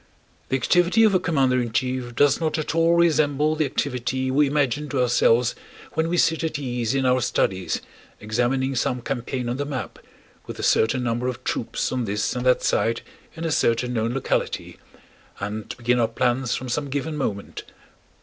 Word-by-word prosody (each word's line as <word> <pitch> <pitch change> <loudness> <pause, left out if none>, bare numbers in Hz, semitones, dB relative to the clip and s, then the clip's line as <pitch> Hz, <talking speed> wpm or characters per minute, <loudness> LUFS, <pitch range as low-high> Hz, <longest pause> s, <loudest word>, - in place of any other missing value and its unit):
The 130 - +1
activity 175 - +3
of 215 -2 +5
a 185 - +4
commander 135 -8 +2
in 120 -2 -3
chief 125 -1 -2
does 145 +3 +3
not 160 0 0
at 155 - -2
all 165 +1 +3
resemble 155 -3 +3
the 155 -2 +1
activity 130 -1 -2
we 145 +2 +3
imagine 145 0 0
to 140 - -1
ourselves 120 -1 +3 0.4
when 160 +1 0
we 175 - 0
sit 165 -1 +2
at 160 -2 -1
ease 125 -3 -2
in 135 -1 +1
our 130 0 +3
studies 95 -6 0 0.4
examining 125 +5 0
some 125 0 -1
campaign 125 -1 -3
on 120 +2 -2
the 145 - -1
map, 140 -4 -5 0.5
with - - -7
a - - -5
certain 125 +3 +2
number 120 +1 -1
of 125 -2 -4
troops - - -2
on 125 -2 -1
this 105 +2 -1
and 125 +1 -2
that 125 - +3
side 115 +1 +1 0.3
in 165 0 -5
a 165 - -1
certain 125 -3 +1
known 115 +1 -1
locality, 135 - -2 0.6
and 105 +2 -5
begin 120 0 +1
our 115 - +3
plans 120 +1 0
from 130 - -5
some 140 +3 -2
given 145 +3 -3
moment. 100 -9 -4
130 Hz, 185 wpm, -23 LUFS, 120-150 Hz, 0.6 s, of